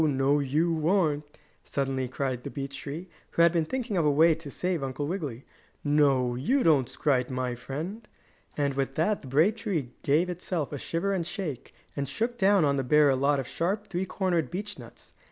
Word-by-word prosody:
No, 140 -1 +3
you 155 +3 +1
aren't!" 155 -7 +2 0.4
suddenly 135 -2 -2
cried 130 -1 -3
the - - -5
beech 140 -1 -5
tree, 155 +6 -6 0.2
who 170 - +3
had 170 - +6
been 165 -2 +1
thinking 240 0 -2
of 170 - +3
a 150 - +4
way 160 +3 +5
to 160 -2 -8
save 175 0 -2
Uncle 135 +2 -3
Wiggily. 145 -7 -4 0.4
"No, 140 -4 +3
you 205 - +1
don't 145 -6 +4
scrite 130 -4 +1
my 130 -1 -2
friend!" 165 - -6 0.5
And 140 -1 +1
with 135 0 -2
that 195 +6 +1
the 135 - -11
brave 160 - +3
tree 170 - -2
gave 155 +6 +2
itself 175 -4 -3
a 145 - -4
shiver 170 +8 -1
and 185 -3 0
shake, 175 - -5 0.2
and 140 -2 -2
shook 235 +9 -2
down 195 -3 +5
on 140 -1 +2
the 135 - 0
bear 150 +2 +5
a - - +2
lot 140 +2 +2
of 130 - -4
sharp, 205 +5 -2
three 185 0 -2
cornered 175 -8 0
beech 205 +3 -5
nuts. - - -14
150 Hz, 200 wpm, -28 LUFS, 135-180 Hz, 0.5 s, had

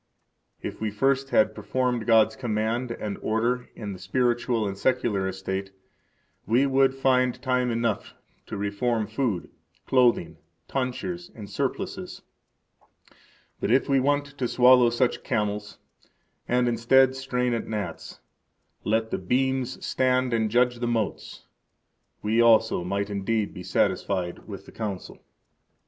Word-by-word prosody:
If - - -6
we 110 - 0
first 135 +5 +1
had 110 -3 +3
performed 125 -1 -1
God's 110 -1 +5
command 115 +1 -1
and 105 -3 -5
order 120 +3 -1
in 105 -2 -6
the 95 - -10
spiritual 120 +2 0
and 100 - -4
secular 100 -3 0
estate, 95 +1 -4 0.8
we 120 +6 +3
would 135 -1 +3
find 130 -2 +2
time 125 -2 0
enough 115 -3 -2 0.3
to 105 - -5
reform 105 +3 -1
food, 110 -3 -2 0.3
clothing, 120 -11 +2 0.3
tonsures, 155 +7 -3
and 105 -3 -8
surplices. - - -4 1.4
But - - -2
if 130 +4 +3
we 135 -1 +3
want 145 +2 +1
to 125 - +1
swallow 125 0 +6
such 120 +1 0
camels, 105 0 -2 0.7
and, 125 0 +2
instead, 130 +3 +4
strain 125 -2 -1
at 115 - -3
gnats, 105 -2 -5 0.6
let 110 +1 0
the - - -1
beams 130 +5 -1
stand 130 -1 +1
and 110 -1 +1
judge 125 +1 +2
the 120 - -1
motes, 115 -3 -3 0.8
we 110 +2 +2
also 115 -5 +4
might 100 +3 -2
indeed 100 +2 -1
be 90 - -8
satisfied 90 -1 -1
with - - -8
the - - -13
Council. 100 -5 -6
115 Hz, 130 wpm, -26 LUFS, 105-125 Hz, 1.4 s, swallow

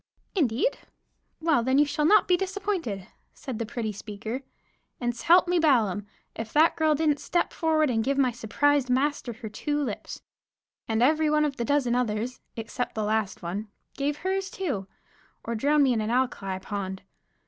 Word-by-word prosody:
"Indeed? 290 - +1 0.6
Well, 320 -6 +3
then 260 +3 +2
you 295 - +6
shall 300 +1 -1
not 415 +3 +5
be 360 - +5
disappointed," 370 - -2 0.3
said 260 -6 -6
the 230 - -2
pretty 230 -4 -3
speaker; 215 +4 -6 0.6
and, 240 -1 -1
s'help 340 +9 +4
me 355 0 +2
Balaam! 220 - +2 0.3
If 225 -1 -5
that 315 +2 +5
girl 315 -1 +3
didn't 300 -1 +1
step 345 - 0
forward 310 -3 +2
and 225 -2 +1
give 275 +3 0
my 260 -3 +3
surprised 260 +4 +1
master 270 0 +1
her 230 0 -8
two 290 +8 -2
lips. 255 -8 -4 0.6
And 225 +1 +1
every 310 +3 +3
one 300 0 +3
of 280 -2 -3
the 235 - -1
dozen 280 -3 +2
others, 240 0 -1
except 230 +2 -4
the 215 - -1
last 210 -3 -1
one, 195 +6 -4 0.3
gave 290 +1 -1
hers 385 +2 -2
too, 305 - -3 0.6
or 235 - -3
drown 285 +6 +3
me 260 -2 +4
in 225 - 0
an 215 - -2
alkali 235 -6 0
pond. 190 0 -5
260 Hz, 175 wpm, -27 LUFS, 220-305 Hz, 0.6 s, you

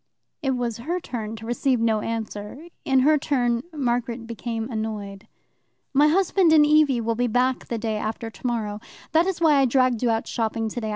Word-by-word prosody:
It 270 -3 0
was 235 -2 -2
her 340 +9 -2
turn 225 -8 -5
to 225 0 -10
receive 245 +2 0
no 225 -1 +2
answer. 225 +7 -5 0.2
In 265 -1 +3
her 300 +3 +4
turn 245 -5 0
Margaret 240 -5 -2
became 230 0 -4
annoyed. 210 -3 -5 0.7
"My 290 +2 +5
husband 360 +1 +3
and 305 -2 +7
Evie 295 -4 +4
will 230 0 0
be 245 +2 0
back 250 +2 0
the 235 - -3
day 220 -1 -2
after 220 +1 -4
tomorrow. 215 -1 -3 0.3
That 330 +3 +3
is 380 -3 -2
why 315 -4 +4
I 270 - +4
dragged 255 -2 +2
you 245 - +2
out 225 0 0
shopping 225 -1 -2
today. 220 0 -4
240 Hz, 185 wpm, -24 LUFS, 225-275 Hz, 0.7 s, and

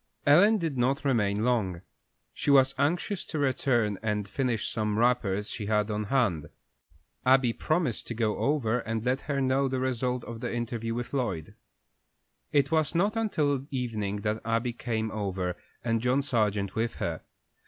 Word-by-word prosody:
Ellen 195 +10 +6
did 160 -8 -2
not 135 +5 +1
remain 105 -6 +1
long. 95 -8 0 0.5
She - - -3
was 135 -1 +6
anxious 175 +6 0
to 155 - -5
return 125 -7 +1
and 105 -2 -1
finish 125 -2 -1
some 105 -1 -1
wrappers 110 -4 +1
she 105 -4 -5
had 105 0 +1
on 105 0 -2
hand. 100 - +1 0.7
Abby 130 -2 +4
promised 155 -6 -1
to 120 - -4
go 110 -2 0
over 125 -5 +1
and 115 0 -3
let 130 +2 +1
her 140 -1 +1
know 135 +1 +2
the 130 0 -1
result 125 -1 -1
of 115 -1 -7
the - - -3
interview 115 -1 -3
with 120 +2 -5
Lloyd. 120 - -2 1.0
It 140 0 +2
was 155 0 +1
not 200 +6 +2
until 145 - 0
evening 110 -6 -2
that 105 +1 -1
Abby 115 +2 0
came 110 -2 -2
over, 95 -4 -2 0.3
and 115 -1 0
John 125 +3 +2
Sargent 105 -7 0
with 115 +1 -1
her. - - -3
120 Hz, 165 wpm, -28 LUFS, 110-135 Hz, 1.0 s, Ellen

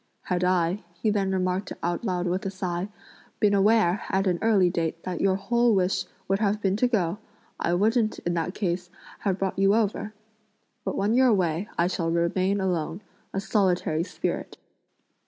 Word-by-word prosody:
Had 180 -1 -1
I," 180 +1 +1
he 215 +5 0
then 195 -2 0
remarked 185 +1 -1
aloud 180 +1 -1
with 180 +2 -1
a - - -1
sigh, 185 0 -3 0.5
"been 205 -1 +3
aware, 200 -2 +3
at 190 +1 +1
an 180 -3 +1
early 210 -5 +4
date, 165 -1 -2
that 180 -2 -3
your 190 -1 +3
whole 235 +3 +2
wish 185 0 +1 0.2
would 195 +1 +1
have 210 -1 +1
been 195 -2 +1
to 250 - +3
go, 200 -5 0 0.4
I 175 - +1
wouldn't, 220 +3 +2
in 175 - -2
that 170 +2 -2
case, 180 -2 -2 0.3
have 195 -3 0
brought 195 0 -2
you 195 +1 +4
over! 215 -1 -1 0.7
But - - -3
when 205 +3 +1
you're 260 +2 +5
away, 185 -3 +1
I 170 - +3
shall 175 -2 -1
remain 185 +4 +1
alone, 180 -1 -1 0.3
a 195 - -2
solitary 180 -6 +1
spirit!" - - -4
190 Hz, 175 wpm, -26 LUFS, 175-205 Hz, 0.7 s, you're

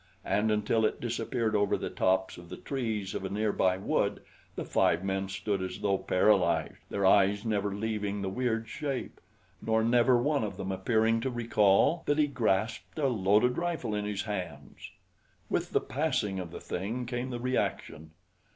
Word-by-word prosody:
And 110 +1 +1
until 105 +1 +1
it 110 - +1
disappeared 115 -1 -1
over 105 -1 +2
the - - -5
tops 95 -1 0
of 85 -1 -13
the - - -7
trees 110 -8 -3
of - - -4
a 95 - -3
near 105 +1 0
by 95 0 +2
wood 95 - 0 0.3
the - - -4
five - - +2
men 95 0 -2
stood 100 +1 -2
as 95 - -4
though 100 -1 +1
paralyzed, 95 +1 +2
their 100 -1 -1
eyes 100 +2 +4
never 105 -2 0
leaving 105 -1 -2
the - - -2
weird 115 +1 -1
shape; 140 0 -4 0.4
nor 110 0 +1
never 120 +2 +4
one 140 +1 +1
of 105 - -4
them 95 - -4
appearing 110 +4 +2
to 130 - -1
recall 115 - +3
that 145 - +2
he 150 - +4
grasped 115 -5 -1
a 150 - 0
loaded 110 - +2
rifle 170 -10 -2
in 105 0 -2
his 105 -1 -2
hands. 90 -9 -6 0.6
With - - 0
the - - +2
passing 95 -2 -1
of 90 -2 -5
the - - -8
thing, 110 +8 -4
came 120 +1 -3
the 120 -1 -4
reaction. 120 - -2
105 Hz, 180 wpm, -29 LUFS, 95-120 Hz, 0.6 s, eyes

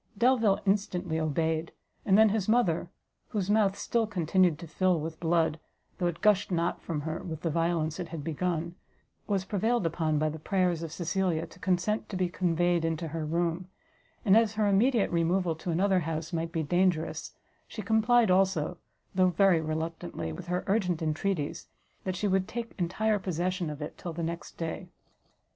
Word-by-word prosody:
Delvile 230 -4 +3
instantly 185 -4 0
obeyed, 160 +1 -1 0.3
and 195 0 +5
then 220 0 +7
his 210 -1 -1
mother, 185 -8 +2 0.4
whose 205 -2 -1
mouth 205 -2 +3
still 230 -2 0
continued 180 -3 +2
to 170 - -8
fill 180 +1 +1
with 160 +1 -5
blood, 165 -2 +1 0.4
though 175 - +1
it 170 -1 -4
gushed 210 -2 +3
not 170 -2 -1
from 155 -3 -3
her 160 +2 -3
with 160 -3 -6
the 165 - -1
violence 165 -1 0
it 175 - -3
had 160 -4 -6
begun, 170 +1 -2 0.5
was 195 -2 0
prevailed 220 +2 0
upon 160 -2 0
by 155 +1 +1
the 155 +1 -4
prayers 180 -1 +1
of 165 -2 -5
Cecilia 175 -1 -1
to 185 - -16
consent 185 +4 0
to 190 - -4
be 180 -1 +1
conveyed 175 -1 +1
into 165 0 -2
her 160 +1 -3
room; 170 +3 -1 0.6
and, 195 -1 +6
as 225 -1 +4
her 215 -1 +2
immediate 215 +3 +3
removal 170 +1 +1
to 175 - -6
another 190 +3 +2
house 165 0 -4
might 165 0 -2
be 165 -2 -1
dangerous, 175 +1 0 0.3
she 215 - -7
complied 220 +1 +4
also, 180 -3 +2 0.3
though 185 -1 +4
very 180 -1 +4
reluctantly, 160 - -4
with 170 - -8
her 180 +1 -1
urgent 185 -5 0
entreaties, 155 0 -2 0.4
that 185 -1 -1
she 205 +3 -1
would 190 -1 +1
take 235 0 -5
entire 205 +5 +1
possession 180 -1 -2
of 150 0 -5
it 150 - -8
till 170 - -5
the 170 +1 -4
next 170 +1 -5
day. 165 +2 -4
175 Hz, 180 wpm, -29 LUFS, 165-195 Hz, 0.6 s, then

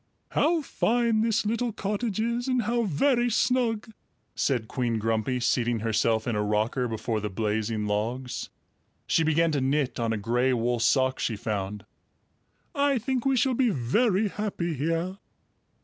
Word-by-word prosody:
"How 330 -1 +2
fine 235 -4 +1
this 225 -1 +1
little 230 +2 0
cottage 210 +1 -2
is 235 +3 -1
and 255 -2 +1
how 235 +2 0
very 240 - +2
snug!" 235 -2 +1 0.4
said 120 -6 0
Queen 120 -2 -1
Grumpy, 115 +3 0
seating 120 -1 +1
herself 110 0 +1
in 120 - -1
a 105 - 0
rocker 110 +4 0
before 110 0 -2
the 105 0 -3
blazing 105 +2 -1
logs. 115 +5 -2 0.6
She - - +2
began 160 +1 +2
to 145 -3 0
knit 135 0 0
on 115 -1 0
a 110 - 0
gray 120 +5 +1
wool 120 0 0
sock 130 +2 +2
she 115 - -1
found. 105 -2 -4 0.9
"I 280 -1 +2
think 255 +2 -1
we 270 -1 +3
shall 260 +2 +2
be 250 0 +2
very 195 - +1
happy 195 -5 -3
here." 165 +6 -2
140 Hz, 155 wpm, -27 LUFS, -, 0.9 s, we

